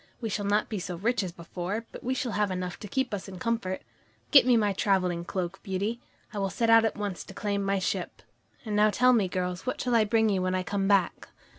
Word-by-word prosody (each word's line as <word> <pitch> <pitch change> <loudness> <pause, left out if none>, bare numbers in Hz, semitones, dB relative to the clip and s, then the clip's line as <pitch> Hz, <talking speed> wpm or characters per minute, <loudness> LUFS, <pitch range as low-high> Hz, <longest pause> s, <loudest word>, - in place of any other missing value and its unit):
We 225 - -3
shall 205 0 -2
not 210 +1 +2
be 215 - -3
so 180 0 -5
rich 230 +8 0
as 185 -3 -4
before, 180 +6 -5
but - - -10
we 255 +2 -1
shall 245 -2 -2
have 210 -1 +1
enough 180 -1 -4
to 210 - -7
keep 260 +2 -1
us 200 -1 -4
in 190 -1 -8
comfort. 195 -2 -2 0.5
Get 270 -5 +8
me 245 -2 +6
my 205 -2 +2
traveling 185 -3 +1
cloak, 185 0 -4
Beauty. 205 +4 -2 0.3
I 205 - -3
will 195 -1 0
set 230 +4 +1
out 225 0 +7
at 225 - -1
once 205 -3 -3
to - - -12
claim 200 -1 -1
my 195 0 +1
ship. 185 - -3 0.4
And 215 -2 -2
now 210 +1 +5
tell 250 +4 +4
me, 215 -6 +3
girls, 180 +3 -3
what 255 - -2
shall 245 - -1
I 225 -2 +5
bring 220 +1 +3
you 195 -2 +1
when 185 0 0
I 185 - 0
come 195 +1 -1
back?" 195 -4 +1
205 Hz, 250 wpm, -28 LUFS, 185-225 Hz, 0.5 s, Get